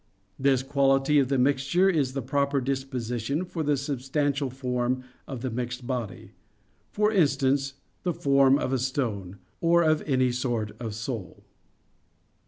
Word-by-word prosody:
This 135 -1 +3
quality 135 +1 +3
of 135 - +2
the 135 +1 +1
mixture 140 +7 +2
is 145 -9 +1
the 135 -2 -3
proper 140 +2 +1
disposition 130 +2 -2
for 175 -2 -5
the 145 -2 +1
substantial 140 +1 -1
form 125 0 -2 0.2
of 130 -4 -6
the 130 -1 -3
mixed 125 +1 -4
body; 120 -7 -4 0.6
for 210 +1 +2
instance, 135 -6 +2 0.3
the 180 - 0
form 140 -1 +4
of 135 -2 -2
a 130 - +1
stone, 110 -8 -2 0.2
or 170 0 +4
of 155 -1 +3
any 130 -3 +2
sort 120 -4 -2
of 110 -3 -5
soul. 110 -3 -6
135 Hz, 145 wpm, -27 LUFS, 125-140 Hz, 0.6 s, form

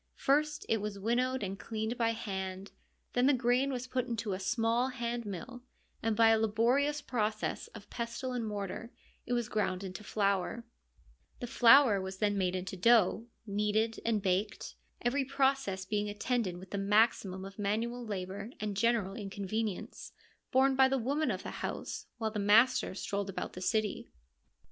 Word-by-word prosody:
First 300 +2 +1
it 225 -2 +1
was 210 -1 -4
winnowed, 245 +4 0
and 195 0 -4
cleaned 220 +1 -3
by 230 -2 +1
hand; 190 -3 -4 0.4
then 245 +1 +3
the 285 - +5
grain 250 +3 +2
was 250 -1 -3
put 255 0 -2
into 225 -4 -2
a 185 - -3
small 225 +5 +1
hand 240 -3 -3
mill, 225 +6 -6 0.4
and 225 -1 0
by 225 +1 +6
a 225 0 +5
laborious 250 +7 +2
process 215 -3 -2
of 200 - -10
pestle 235 +2 -4
and 245 -2 -2
mortar 210 +2 -4 0.4
it - - -1
was 240 -2 0
ground 195 -3 -1
into 190 +2 -7
flour; 200 +2 0 0.7
the - - -4
flour 240 -3 +6
was 190 0 -6
then 205 0 +1
made 185 -2 0
into 185 +1 -4
dough, 225 +2 +4 0.2
kneaded 210 +2 0
and 220 -3 0
baked; 190 +2 -1 0.3
every 265 +4 +1
process 265 -8 0
being 210 0 -1
attended 210 -3 -1
with 185 +1 -12
the 200 - -2
maximum 200 -2 +2
of 195 +2 -11
man 205 +2 +1
ual 235 0 -5
labour 200 +2 -4
and 210 -1 -3
general 215 -2 +1
inconvenience, 200 0 -4 0.4
borne 265 +1 +4
by 265 0 +6
the 270 0 +1
women 280 +6 0
of - - -2
the - - -5
house, - - -4
while 220 -2 -2
the 210 - -3
master 230 +3 +4
strolled 200 0 -3
about 190 - -4
the 180 - -8
city. 215 +1 -1
220 Hz, 170 wpm, -32 LUFS, 200-245 Hz, 0.7 s, by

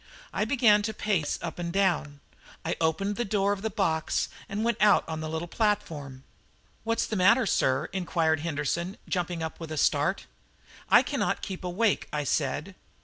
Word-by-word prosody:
I 210 - 0
began 225 -4 +4
to 215 +1 -3
pace 185 -10 0
up 170 0 -5
and 170 -1 -3
down; 170 -7 0 0.4
I 165 - 0
opened 195 +6 0
the 240 - 0
door 200 -2 +1
of 200 - -6
the 220 - -1
box 165 -7 0 0.2
and 205 +2 -2
went 235 -1 0
out 210 -1 +5
on 160 -1 -4
the 155 0 -4
little 160 +2 -3
platform. 160 - -2 0.6
"What's 230 0 0
the 220 - -3
matter, 220 +6 +5
sir?" 130 -9 +2
inquired 165 -4 +1
Henderson, 170 +4 -2
jumping 175 -2 -2
up 160 - -5
with 165 -2 -7
a 155 - -4
start. - - +1 0.6
"I - - +7
cannot - - -1
keep 190 -2 -5
awake," 190 +4 +1
I 150 -1 -1
said. 150 +6 -1
180 Hz, 175 wpm, -28 LUFS, 160-210 Hz, 0.6 s, I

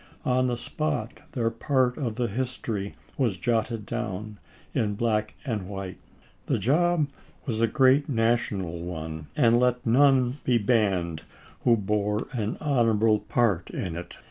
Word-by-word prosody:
On 130 0 +2
the 120 -1 -1
spot, 130 -3 -3
their 115 -3 0
part 125 +1 +1
of 120 -8 -3
the 120 +1 0
history 115 -3 -3 0.2
was 115 -8 +1
jotted 115 +1 -1
down 105 -3 -4 0.3
in 105 -2 0
black 110 -1 0
and 105 -8 -3
white. 95 -2 -6 0.5
The - - +2
job 160 +3 +2 0.4
was 115 -5 -1
a 115 - +4
great 135 +4 +4
national 115 -8 0
one, 80 -3 -6
and 120 0 +5
let 125 0 +1
none 130 +1 +4
be 125 -2 +3
banned 100 -8 +1 0.4
who 120 -2 +5
bore 105 +1 0
an 110 -3 -2
honorable 115 -6 +3
part 105 -9 +1
in 90 -4 -4
it. 85 0 -8
115 Hz, 145 wpm, -26 LUFS, 100-125 Hz, 0.5 s, and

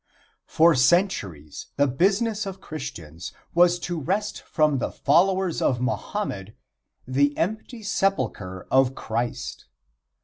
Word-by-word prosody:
For 165 +1 +5
centuries 125 - +1
the 145 - +3
business 200 - +1
of 195 0 -6
Christians 85 - -7 0.2
was 175 +1 +5
to 175 -2 -3
wrest 200 +8 -2
from 150 -4 +1
the - - -2
followers 185 +4 +2
of 125 - +1
Mohammed 125 - -3 0.5
the 140 +3 +1
empty 220 +5 -3
sepulcher 130 - -1
of 135 0 +3
Christ. 115 +2 -4
155 Hz, 110 wpm, -24 LUFS, 125-195 Hz, 0.5 s, For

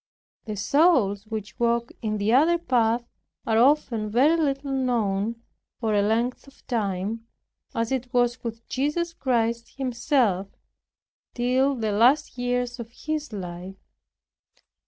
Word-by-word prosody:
The 215 -2 -4
souls 215 - +3
which 215 0 -6
walk 235 0 +1
in 215 -2 -1
the 210 +2 +1
other 320 +7 +5
path 235 -6 +1 0.4
are 220 -1 +2
often 235 -5 +2
very 265 +9 +4
little 280 -3 -1
known, 230 -4 -1 0.4
for 225 -3 0
a 205 - +3
length 230 +6 0
of 275 - -19
time, 215 0 -2 0.5
as 230 +1 -1
it 255 -2 -2
was 245 -1 +1
with 230 -1 -6
Jesus 300 +6 -1
Christ 235 -5 -1
Himself, 240 -6 +1 0.9
till 255 +3 +2
the 220 -3 -1
last 250 +9 +3
years 245 0 -2
of 230 -1 -6
His 305 +4 -4
life. 180 -1 -7
235 Hz, 130 wpm, -25 LUFS, 220-265 Hz, 0.9 s, other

